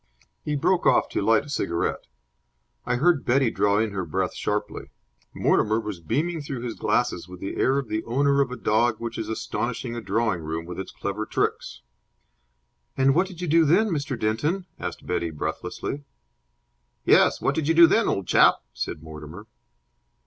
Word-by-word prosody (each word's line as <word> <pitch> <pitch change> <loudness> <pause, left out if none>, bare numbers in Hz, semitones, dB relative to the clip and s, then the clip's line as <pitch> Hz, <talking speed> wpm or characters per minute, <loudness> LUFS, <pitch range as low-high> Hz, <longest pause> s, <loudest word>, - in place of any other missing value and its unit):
He 150 - -2
broke 180 +5 +2
off - - +4
to - - -2
light 115 -1 +3
a - - -12
cigarette. 85 -11 -2 0.8
I 125 - +1
heard 155 +3 +3
Betty 130 -1 +2
draw 100 0 +2
in 110 0 +1
her 95 -2 -3
breath 90 +3 -2
sharply. - - -3 0.4
Mortimer 110 +1 +2
was 105 -5 -5
beaming 150 - -1
through 140 -4 -5
his 120 -2 -4
glasses - - 0
with 90 0 -11
the 95 - -5
air 135 +1 +2
of 140 -3 -2
the 110 0 -2
owner 140 +3 +2
of 135 - 0
a 125 - -5
dog 110 +1 +2
which 115 0 -5
is 110 - -4
astonishing 115 +2 -3
a 120 - -4
drawing 105 -2 0
room 80 +1 -4
with 90 +1 -7
its 95 - -6
clever 105 +2 -4
tricks. - - -2 1.1
"And 135 0 +4
what 180 +5 +2
did 180 -2 -10
you 180 - -2
do 165 +2 +5
then, 185 +9 +3
Mr. 140 - -2
Denton?" 150 - 0
asked - - -6
Betty, 85 - -1
breathlessly. 110 - -4 1.0
"Yes, - - +5
what - - +1
did 160 -3 -2
you 165 - +3
do 170 +1 +9
then, 220 +6 +3
old 95 - -1
chap?" - - +5 0.2
said - - -5
Mortimer. 80 +5 -10
115 Hz, 180 wpm, -25 LUFS, 100-145 Hz, 1.1 s, do